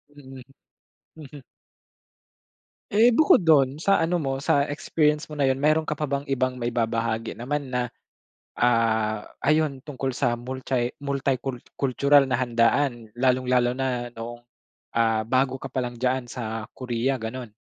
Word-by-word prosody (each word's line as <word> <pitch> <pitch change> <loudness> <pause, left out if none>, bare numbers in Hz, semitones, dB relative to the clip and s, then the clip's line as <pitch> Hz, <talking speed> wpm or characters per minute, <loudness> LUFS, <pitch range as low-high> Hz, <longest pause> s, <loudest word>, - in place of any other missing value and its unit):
Mm. 135 -2 -12 0.8
Mhm. 145 -3 -11 1.5
Eh, 225 +4 +5
bukod 245 - +5
dun 140 -4 +4
sa 195 -2 +4
ano 165 +2 +1
mo 135 -5 -1
sa 140 0 +2
experience 150 +1 0
mo 150 - -8
na 145 - 0
yun 135 0 +2
meron 155 +2 +3
ka - - -5
pa 150 0 -2
bang 140 +1 -2
ibang 130 -2 -1
maibabahagi 115 -2 -2
naman 140 +4 -3
na, 125 -1 -2 0.6
ah, 110 -3 +1 0.2
ayun 150 -3 +1
tungkol 135 -2 -4
sa 120 -3 0
multi 125 0 -3
multi-cul 135 -2 -2 0.2
cultural 140 +1 +3
na 125 - +1
handaan 120 -1 +1
lalong-lalo 125 -1 +2
na 125 -2 -3
noong, 120 +1 -8 0.5
ah, 115 -1 +1
bago 130 +2 +1
ka - - -10
pa 130 - -2
lang 120 -1 -5
diyan 125 0 -1
sa 110 -3 -5
Korea 130 +1 -1
ganon? 115 +1 -6
130 Hz, 145 wpm, -25 LUFS, 120-140 Hz, 1.5 s, Eh